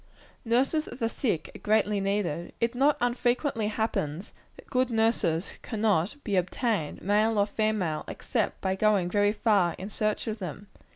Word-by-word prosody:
Nurses 265 +7 +1
of - - -8
the 230 - 0
sick 220 - -2
are - - -8
greatly 210 -1 +2
needed. 195 -4 -1
It 230 +1 +1
not 275 +4 +3
unfrequently 245 -1 +1
happens, 210 -6 -2 0.2
that - - -14
good 255 -1 +1
nurses 220 -7 0
cannot 210 - 0
be 205 -4 0
obtained, 185 - -1
male 215 +3 +2
or 200 - +4
female, 210 -7 -1
except - - -2
by 190 -1 0
going 195 -3 +2
very 205 0 +3
far 205 -5 +2
in 195 +3 -7
search 215 +1 -1
for 220 - -2
them. 195 -2 -7
210 Hz, 160 wpm, -28 LUFS, 190-230 Hz, 0.2 s, or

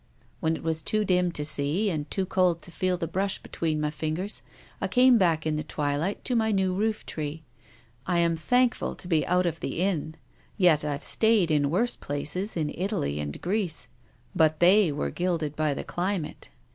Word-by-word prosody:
" - - -34
When 160 0 +1
it - - -8
was 160 -1 0
too 215 +7 +1
dim 180 -2 +2
to 150 - -2
see, 155 +8 +1
and 150 -3 -4
too 190 - 0
cold 180 -3 +1
to 175 - -7
feel 185 +1 0
the 170 -2 -3
brush 195 +4 -1
between 160 -2 -3
my 150 0 -1
fingers, 160 +6 -3 0.4
I - - 0
came 250 -1 +5
back 165 -4 +2
in 155 -1 0
the 155 - -2
twilight 150 +6 -2
to 250 - 0
my 220 -1 +2
new 190 -2 +1
roof 215 +3 -1
tree. 155 +1 -5 0.6
I 175 - +1
am 170 -1 +3
thankful 245 +10 +1
to - - -8
be 165 -4 +1
out 180 +1 +2
of 165 -2 -2
the - - -4
inn, 170 -4 -1 0.4
yet 175 -7 +4
I've 145 -1 -3
stayed 220 -7 +3
in 145 -2 +2
worse 230 +10 +1
places 155 +8 -3
in 155 -2 -1
Italy 180 - -2
and 75 -1 -4
Greece. 185 -3 -1 0.5
But 155 -1 +3
they 185 0 +5
were 145 - -2
gilded 165 -5 -1
by 155 -2 0
the - - -4
climate." 180 -2 -3
170 Hz, 195 wpm, -27 LUFS, 155-195 Hz, 0.6 s, came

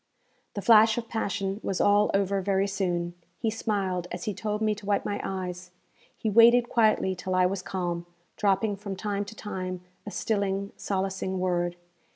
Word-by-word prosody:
The 200 - -4
flash 220 +1 +6
of 235 -1 -3
passion 200 -3 -2
was 190 - -2
all 205 +1 +4
over 195 0 +1
very 195 0 +1
soon. 175 -3 -1 0.2
He 225 -2 -1
smiled 195 -5 -1
as 180 - -5
he 210 - -2
told 210 +2 -2
me 215 -1 +2
to 210 -1 -10
wipe 205 -1 +1
my 205 - -2
eyes; 180 -1 -4 0.5
he - - -3
waited 235 +3 +6
quietly 215 -5 +3
till 185 0 -3
I 185 0 +4
was 185 +1 -1
calm, 175 -2 -3 0.3
dropping 200 +1 +1
from 200 -1 -5
time 205 +1 -2
to 215 +2 -10
time 185 -4 -5 0.3
a - - -2
stilling, 200 -2 -1
solacing 190 -1 -2
word. 175 -1 0
195 Hz, 175 wpm, -27 LUFS, 185-210 Hz, 0.5 s, flash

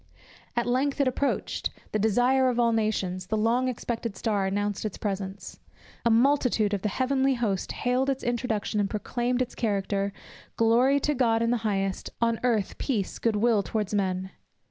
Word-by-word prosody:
At 240 -1 +1
length 265 +4 0
it 280 - +3
approached 275 +2 -1 0.2
the 215 - 0
Desire 245 +5 +3
of 245 -1 -1
all 235 -1 +4
Nations 195 -5 -1
The 220 - 0
long 235 +4 +2
expected 230 -4 -3
Star 205 -4 0
announced 205 +1 -1
its 215 -3 -4
presence 195 -1 -5 0.4
A 235 - +3
multitude 235 -3 +3
of 200 - -1
the 210 - 0
heavenly 265 +4 +1
host 210 -6 -1
hailed 255 +2 0
its 270 -1 -2
introduction, 235 -3 -1
and 200 -1 +1
proclaimed 245 +3 -1
its 250 - -9
character; 200 -2 -1 0.5
"Glory 245 +5 +4
to 295 - +1
God 230 -4 +2
in 230 - +1
the 245 - +2
highest, 195 -4 -2
on 230 -1 +1
earth 225 -6 0
peace, 215 -9 -2
good 230 -2 +1
will 220 0 +3
towards 210 +2 -3
men." 190 -2 -1
225 Hz, 170 wpm, -27 LUFS, 205-250 Hz, 0.5 s, all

